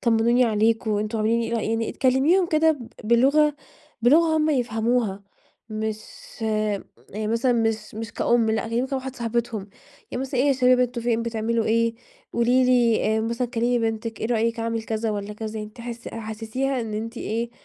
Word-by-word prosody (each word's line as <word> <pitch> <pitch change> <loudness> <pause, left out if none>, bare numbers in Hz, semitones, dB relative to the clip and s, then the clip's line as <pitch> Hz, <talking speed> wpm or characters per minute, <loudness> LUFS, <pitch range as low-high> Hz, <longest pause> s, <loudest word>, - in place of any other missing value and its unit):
طمنوني 235 +2 +3
عليكم، 220 -1 +1
أنتم 215 +2 -2
عاملين 225 +2 +2
إيه؟ - - -3
إيه - - -1
رأ - - -1
يعني 225 0 -1
تكلميهم 280 +9 +3
كده 320 0 +4
ب 255 -7 -9 0.2
بلغة 280 +6 +4 0.5
بلغة 315 +6 +5
هم 310 0 +2
يفهموها، 230 -5 0 0.5
مش 215 0 -3 1.1
يعني 215 +2 -4
مثلًا 230 +3 +2
مش 225 -2 -1
مش 225 +1 -6
كأم، 235 -2 +2
لأ 220 0 -1
كلّميهم 235 +3 0
كواحدة 265 -1 -4
صاحبتهم، 235 -1 -1 0.5
يعني - - -3
مثلًا، 265 -1 -1
إيه 275 - +3
يا 285 - +5
شباب 255 -1 +4
أنتم 245 -1 0
فين؟ 230 -1 0
بتعملوا 230 0 -1
ايه؟ 230 +1 +2 0.4
قولي 245 +2 +3
لي 240 -3 +3
آآ، - - +1
مثلًا 235 +2 -2
كلمي 240 +1 +1
بنتِك، 225 0 -3
إيه - - -1
رأيِك 230 0 0
أعمل 230 0 -2
كذا 220 0 -2
والّا 205 0 -4
كذا؟ 220 +1 -5
أنتِ 215 +3 -9
حس 235 0 -7
حسسيها 230 +4 -3
إن 220 -2 -4
أنتِ 225 +3 -5
إيه، 230 +1 -3
230 Hz, 175 wpm, -24 LUFS, 220-250 Hz, 1.1 s, بلغة